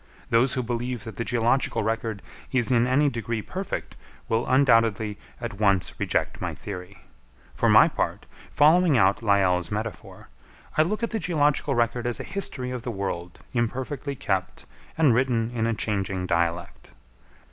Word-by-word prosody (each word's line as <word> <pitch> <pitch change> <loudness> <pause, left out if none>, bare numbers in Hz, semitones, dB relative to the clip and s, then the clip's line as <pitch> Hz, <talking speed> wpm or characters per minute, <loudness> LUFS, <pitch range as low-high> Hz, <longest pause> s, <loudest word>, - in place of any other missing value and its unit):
Those 120 +3 +3
who 130 - -1
believe 120 -1 -3
that 110 -3 -9
the 115 - -1
geological 120 0 +1
record 110 -1 -2 0.3
is 130 -2 +2
in 120 -1 +3
any 140 +4 +3
degree 115 -4 -3
perfect, 190 0 -5 0.3
will 115 +1 0
undoubtedly 115 -5 +3 0.2
at 115 -4 -6
once 100 -4 +1
reject - - -1
my - - -3
theory. 90 0 -9 0.5
For - - +1
my - - +7
part, - - -3 0.2
following 160 0 +4
out 100 0 +3
Lyell's 95 -5 +2
metaphor, 110 -3 -6 0.5
I - - +4
look 210 +8 -1
at 230 - -1
the 225 - -1
geological 150 -5 +1
record 120 0 0
as 120 - -2
a - - -4
history 130 -10 -2
of 125 -1 -4
the 125 - -5
world 95 -5 -5
imperfectly 130 +4 -2
kept 95 -6 -3 0.3
and 155 -6 +5
written 120 -2 +1
in 115 -1 0
a 115 - +1
changing 100 -3 -2
dialect. 85 0 -2
115 Hz, 160 wpm, -25 LUFS, 105-130 Hz, 0.5 s, my